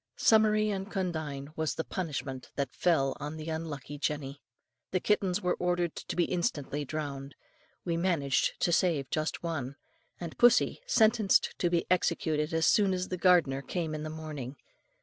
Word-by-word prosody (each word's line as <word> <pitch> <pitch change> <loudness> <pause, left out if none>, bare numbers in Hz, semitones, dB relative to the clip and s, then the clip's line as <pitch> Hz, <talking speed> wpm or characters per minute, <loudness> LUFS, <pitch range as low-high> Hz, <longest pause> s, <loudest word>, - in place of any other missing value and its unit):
"Summary 215 -1 +4
and 195 0 -4
condign 155 -7 -3
was 160 -1 -1
the 160 - -2
punishment 140 -8 -4
that 140 -3 -2
fell 135 -6 +2
on 150 +2 -5
the 155 +1 -6
unlucky 145 -3 -5
Jenny. 145 -1 -3 0.5
The 185 - 0
kittens 195 -1 +1
were 180 - +2
ordered 175 -2 0
to - - -6
be 175 - +3
instantly 150 -5 -2
drowned, 140 -1 -5 0.5
we 170 -2 0
managed 165 -7 +1
to 175 - +2
save 165 -6 +1
just 155 +2 -2
one, 140 -6 -3 0.4
and 170 -2 -6
pussy 240 - +4
sentenced 220 - +4
to 175 - +2
be 170 -1 +1
executed 160 -3 +1
as 160 0 +2
soon 195 -3 +4
as 180 0 -3
the 185 - -2
gardener 170 -7 +4
came 160 +1 -3
in 155 - -4
the 155 - -4
morning. 155 -4 -6
160 Hz, 165 wpm, -30 LUFS, 145-180 Hz, 0.5 s, Summary